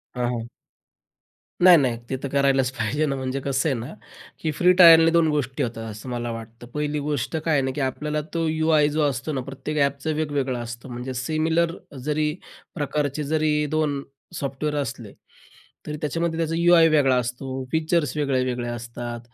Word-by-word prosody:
हां, 125 -1 0
हां. 115 0 -5 1.1
नाही-नाही, 145 -10 +6
ते 135 - -1
तर - - -1
करायलाच 135 -2 +3
पाहिजे 130 +5 -1
ना. 140 - -1
म्हणजे 130 0 -3
कसं 140 +3 +1
आहे 135 - 0
ना 125 +8 -7 0.5
की 160 - 0
फ्री 180 0 +6
ट्रायलने 165 -1 +9
2 170 -1 +4
गोष्टी 140 -4 -1
होतात, 115 -1 -4
असं 105 +4 -9
मला 120 -1 -3
वाटतं. 115 +1 -9
पहिली 150 0 -1
गोष्ट 150 +2 -2
काय 160 +1 -1
आहे 140 - +3
ना 130 - -1
की 145 - -2
आपल्याला 150 +3 -3
तो 165 -1 0
यू-आय 155 -1 +3
जो 155 - +2
असतो 135 +4 -4
ना, 130 - -2
प्रत्येक 135 +3 -5
ॲपचं 140 +3 -2
वेगवेगळं 145 -5 -1
असतं. 120 +2 -7
म्हणजे 125 +2 -5
सिमिलर 160 +5 0 0.3
जरी 150 0 0 0.4
प्रकारचे 150 -1 -1
जरी 155 -1 +2
2 150 -3 0 0.4
सॉफ्टवेअर 140 +2 -3
असले, 120 -6 -6 0.7
तरी 150 - -4
त्याच्यामध्ये 165 +2 -2
त्याचा 165 0 0
यू-आय 170 -1 +6
वेगळा 140 -4 +4
असतो, 130 +2 -3
फीचर्स 160 -3 0
वेगळे, 135 -3 +1
वेगळे 125 -1 -2
असतात. 120 0 -6
140 Hz, 170 wpm, -24 LUFS, 125-155 Hz, 1.1 s, ट्रायलने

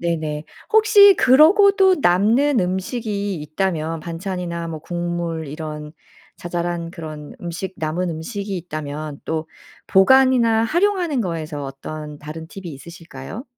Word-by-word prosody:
네네. 155 -3 -2 0.3
혹시 425 -2 +7
그러고도 380 +7 +6
남는 225 +10 +3
음식이 200 +2 -2
있다면 160 0 -2
반찬이나 170 0 -5
뭐 160 -2 -6
국물 170 -2 -4
이런 150 0 -7 0.4
자잘한 175 -1 -3
그런 155 -4 -9
음식, 175 +2 -5
남은 165 +3 -2
음식이 195 +5 -5
있다면 155 -3 -6
또 160 0 -3 0.4
보관이나 235 +1 +4
활용하는 345 - +1
거에서 160 -6 -4
어떤 150 +2 -8
다른 160 +2 -8
팁이 190 +1 -10
있으실까요? 165 - -10
175 Hz, 280 characters per minute, -21 LUFS, 155-220 Hz, 0.4 s, 혹시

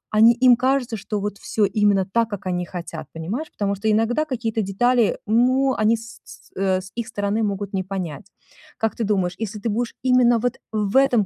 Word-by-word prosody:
они 225 +2 +7
им 250 0 +6
кажется, 255 -2 0
что 210 +1 -4
вот 205 0 -4
всё 215 - 0
именно 200 -1 +2
так, 230 +4 0
как 200 -3 -6
они 180 -1 -1
хотят, 165 -4 -7
понимаешь? 200 - -5
Потому 200 -1 -1
что 210 +3 -1
иногда 225 +8 +1
какие-то 230 -5 -2
детали, 230 +4 +2
ну, 255 +4 +3
они 220 +1 +2
с 230 +1 -12
с - - -15
э, 190 -1 +1
с 190 +1 -12
их 235 -2 -3
стороны 205 +2 -1
могут 200 -1 -3
не 190 -1 -1
понять. 185 -1 -5 0.5
Как 225 -1 -1
ты 230 - -2
думаешь, 190 -4 0
если 215 -1 -4
ты 230 - -2
будешь 230 +3 -2
именно 250 -2 +4
вот 245 +1 -2
в 210 +2 0
этом 245 -6 +4
215 Hz, 205 wpm, -22 LUFS, 195-240 Hz, 0.5 s, они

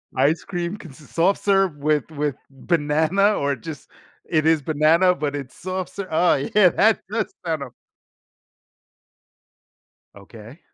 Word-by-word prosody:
Ice 145 +5 +2
cream 175 +1 -4
consists 150 - -14
of - - -20
soft 185 +4 +2
serve 195 -5 +2
with 150 +1 0
with 145 -3 -2
banana 160 +7 +1
or 140 -4 -1
just 145 +5 -10 0.4
it 155 -2 +1
is 160 -2 +3
banana, 160 +5 +3
but 145 -3 -3
it's 135 -3 -7
soft 185 0 -5
serve 200 -1 -6
oh, 170 +2 +3
yeah. 180 +7 +3
That 215 +4 +3
does 225 - -2
sound 160 -3 -2
o 135 - -8 2.5
Okay. 110 - -13
155 Hz, 140 wpm, -22 LUFS, 145-180 Hz, 2.5 s, is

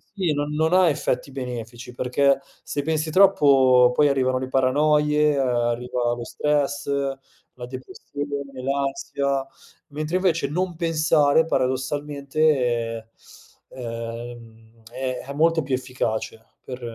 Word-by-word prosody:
sì, 180 -6 0
no 145 0 -1
non 160 +3 0
ha 185 -2 +5
effetti 135 -1 -2
benefici, 125 -2 -7
perché 135 +2 +2 0.2
se 145 - -3
pensi 155 +1 -1
troppo 135 -9 +5
poi 145 +2 +4
arrivano 130 -2 +1
le 130 - -5
paranoie, 150 +3 +2
ehm, 140 - 0
arriva 120 -1 0
lo 120 - -5
stress, 145 0 -1 0.7
la 125 -1 -8
depressione, 140 0 -7
l'ansia, 140 0 -1 0.4
mentre 155 +4 -2
invece 170 -6 +1
non 180 +3 -2
pensare 160 -2 +3
paradossalmente, 130 -4 -1 0.6
ehm, 115 -1 -8
è 130 0 -3
è - - -4
molto 165 +2 +2
più 135 -1 0
efficace 120 -3 -4 0.2
per 125 -1 -8
135 Hz, 115 wpm, -23 LUFS, 125-150 Hz, 0.7 s, ha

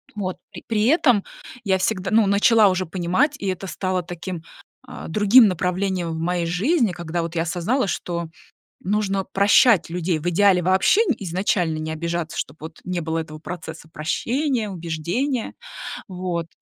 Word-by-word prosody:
Вот. 185 -3 -3
При - - -9
при 220 -2 +1
этом 245 - +4 0.4
я 190 -3 +1
всегда, 185 0 -1
ну, 220 -2 +4
начала 210 +2 +5
уже 185 0 -1
понимать, 185 - 0
и 200 - -4
это 185 0 -3
стало 185 -1 -2
таким, 175 0 -6 0.4
а, - - -8
другим 210 +6 +6
направлением 180 -1 -1
в 160 - -4
моей 175 +1 -1
жизни, 220 - +1
когда 170 -1 -3
вот 165 0 -5
я 165 - +1
осознала, 190 +9 0
что 170 -2 -3 0.5
нужно 195 0 0
прощать 200 -1 +4
людей, 170 -1 -1
в 160 - -5
идеале 185 +1 +4
вообще, 190 - +3
н 350 - +1
изначально 180 -3 -1
не 155 0 -4
обижаться, 170 +1 -3
чтоб 140 - -4
вот 160 +1 -9
не 180 -1 -2
было 160 0 -2
этого 155 -1 -7
процесса 160 -1 -8
прощения, 235 - -1
убеждения, 180 - -2 0.6
вот. 180 -3 -3
185 Hz, 160 wpm, -22 LUFS, 170-205 Hz, 0.6 s, другим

